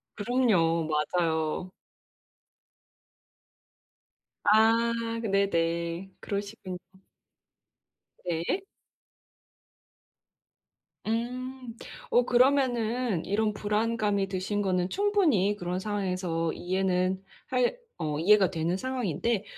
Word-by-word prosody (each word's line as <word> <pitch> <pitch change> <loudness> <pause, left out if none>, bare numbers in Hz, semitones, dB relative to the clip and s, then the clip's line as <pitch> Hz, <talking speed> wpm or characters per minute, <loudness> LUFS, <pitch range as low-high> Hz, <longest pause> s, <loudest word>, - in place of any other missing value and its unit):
그럼요. 200 -9 +2
맞아요. 160 +2 0 2.7
아 225 +2 +5 0.3
네네. 170 -3 0
그러시군요. 200 -2 -5 1.5
네. 175 - -1 2.4
음. 250 +2 -3 0.3
어, 245 - +4
그러면은 245 - +2
이런 210 +2 +1
불안감이 210 -1 0
드신 195 +2 -2
거는 185 -2 0
충분히 340 - +2
그런 180 -1 -3
상황에서 185 -5 -2
이해는 185 0 0 0.3
할 250 - +1 0.2
어, 155 -3 -2
이해가 195 +2 +5
되는 165 0 -1
상황인데 235 - -1
200 Hz, 165 characters per minute, -28 LUFS, 180-230 Hz, 2.7 s, 아